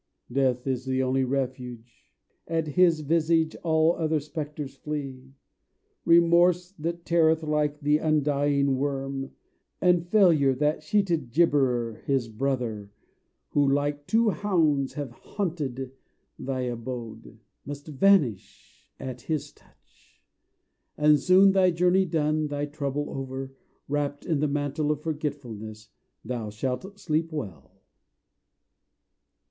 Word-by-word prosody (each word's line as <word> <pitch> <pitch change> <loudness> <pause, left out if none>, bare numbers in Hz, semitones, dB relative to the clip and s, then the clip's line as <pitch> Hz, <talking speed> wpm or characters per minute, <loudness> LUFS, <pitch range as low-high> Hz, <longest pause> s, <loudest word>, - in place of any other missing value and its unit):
Death 130 -1 +1
is 130 -1 -2
the 130 0 0
only 130 +1 +1
refuge: 125 -4 -4 0.4
at 165 -2 -1
his 165 0 +3
visage 160 +1 +1
All 160 0 +2
other 160 -1 0
spectres 150 -2 -6
flee. 135 -3 -6 0.7
Remorse 170 +1 +4
that 170 +2 -4
teareth 160 -1 +3
Like 150 -1 0
the 150 +1 +3
undying 145 -3 +1
worm, 135 -1 -3 0.5
and 175 -1 +3
Failure, 165 -10 +4
That 150 +3 0
sheeted 165 - 0
gibberer, 125 -7 +2
his 135 -4 0
brother, 115 -4 -2 0.6
Who 145 -2 +2
like 145 +1 -1
two 225 -1 +3
hounds 155 -7 +1
have 145 -4 -5
haunted 135 - -4 0.5
thy 130 -1 -3
abode, 120 -2 -6 0.3
Must 145 0 -8
vanish 150 - +1
at 125 -2 -6
his 150 +1 -3
touch: - - -30 0.7
And 150 0 +5
soon, 185 +5 +6
thy 190 -1 +4
journey 180 +2 +3
done, 155 -2 0
thy 145 0 -2
trouble 145 -1 -3
over, 135 0 -5 0.3
Wrapped 145 0 -2
in 160 -4 0
the 150 - +1
mantle 145 +1 -1
of 150 -1 -1
forgetfulness 120 -9 -5 0.4
Thou 115 -2 -4
shalt 130 - -4
sleep 160 +1 -1
well. 100 - -8
145 Hz, 115 wpm, -26 LUFS, 130-160 Hz, 0.7 s, soon